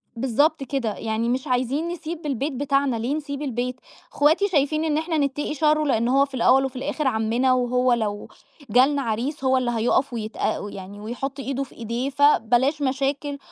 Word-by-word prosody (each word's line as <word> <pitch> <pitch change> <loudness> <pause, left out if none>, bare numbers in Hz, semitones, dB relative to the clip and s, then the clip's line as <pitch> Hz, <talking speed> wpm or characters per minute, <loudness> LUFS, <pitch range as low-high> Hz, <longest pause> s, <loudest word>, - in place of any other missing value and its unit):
بالضبط 275 +5 +1
كده، 250 -5 -2
يعني 225 +1 -2
مش 255 +4 -1
عايزين 260 +5 0
نسيب 335 -1 -6
البيت 280 +1 -2
بتاعنا، 275 -1 +1
ليه 235 +5 -2
نسيب 290 -2 -5
البيت؟ 250 -2 -2 0.4
أخواتي 315 +8 +3
شايفين 310 -3 +1
إن 305 -2 +1
إحنا 320 +1 -1
نتقي 290 +1 -1
شره 305 +1 +2
لأنه 255 0 +2
هو - - +5
في 280 - -20
الأول 260 +1 +4
وفي 265 0 -5
الآخر 290 +3 -2
عمنا 235 +2 +2
وهو 250 0 +2
لو 210 -3 -2 0.4
جالنا 270 +6 +4
عريس 255 +6 -3
هو 260 0 +3
اللي 250 -2 0
هيوقَف 240 +3 +1
ويتأ 215 -2 -3
يعني 195 +1 -9
ويحط 255 +6 -5
إيده 275 0 -2
في - - -14
إيديه 235 +3 -3
فبلاش 280 0 +3
مشاكل 280 +1 -1
265 Hz, 175 wpm, -23 LUFS, 240-290 Hz, 0.4 s, هو